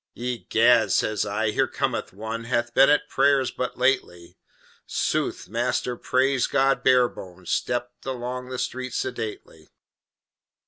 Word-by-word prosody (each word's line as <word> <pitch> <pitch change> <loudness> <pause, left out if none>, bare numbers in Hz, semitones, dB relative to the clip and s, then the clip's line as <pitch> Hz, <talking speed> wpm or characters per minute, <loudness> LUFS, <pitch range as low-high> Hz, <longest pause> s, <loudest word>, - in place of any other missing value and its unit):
"Egad!" 120 -1 +2
says 110 -1 +1
I, 105 +1 0
"here - - +1
cometh - - -2
one 110 +3 -6
Hath 120 0 -1
been 135 +3 +6
at 150 0 +4
's - - -23
prayers 135 -1 +3
but 125 - -4
lately." 125 -10 0 0.5
Sooth, - - -1
Master 125 - -1
Praise 130 +1 +1
God 135 0 +2
Barebones 95 -9 +1
stepped 120 +1 -2
Along 125 0 -4
the 130 - -4
street 130 0 -4
sedately. 110 -10 -5
125 Hz, 130 wpm, -24 LUFS, 110-130 Hz, 0.5 s, been